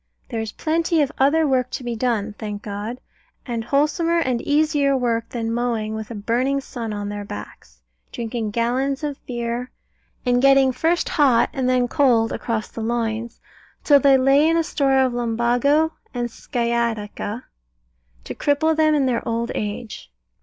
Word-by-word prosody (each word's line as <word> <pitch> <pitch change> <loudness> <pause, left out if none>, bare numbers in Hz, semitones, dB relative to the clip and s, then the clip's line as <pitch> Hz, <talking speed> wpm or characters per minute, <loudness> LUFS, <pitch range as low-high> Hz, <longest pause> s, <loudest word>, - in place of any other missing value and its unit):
There 230 -3 -2
is 220 -1 -5
plenty 325 - +1
of 285 - -2
other 300 +4 +4
work 255 -3 +1
to 255 - -5
be 240 -1 -3
done, 220 -3 -1
thank 210 -2 -5
God; 210 +4 -5 0.5
and 235 -3 -3
wholesomer 305 +6 +1
and 255 -6 0
easier 290 -2 +2
work 235 -2 -1
than 230 -1 -3
mowing 230 -3 -1
with 220 -1 -5
a 235 - -6
burning 245 +6 0
sun 235 -4 -6
on 205 -1 -4
their 205 0 -5
backs, 65 - -10 0.3
drinking 230 -1 -3
gallons 255 +6 -1
of 290 -2 -4
beer, 240 0 -3 0.6
and 245 0 +2
getting 275 -1 +5
first 325 +7 0
hot 265 -7 +3
and 260 -3 0
then 250 -1 +2
cold 240 -5 +3
across 225 -2 -2
the 230 - -8
loins, 230 0 -2 0.4
till 285 -2 +6
they 275 0 +5
lay 275 +3 +4
in 330 - +2
a 330 - +2
store 275 -3 +1
of 260 -2 +3
lumbago 245 +7 +1 0.2
and 240 -1 -2
sciatica, 235 -2 -2 0.8
to - - -6
cripple 315 +2 +1
them 310 -1 +3
in 280 -2 +2
their 245 -3 0
old 230 +1 -1
age. 210 -1 -5
245 Hz, 165 wpm, -22 LUFS, 230-275 Hz, 0.8 s, till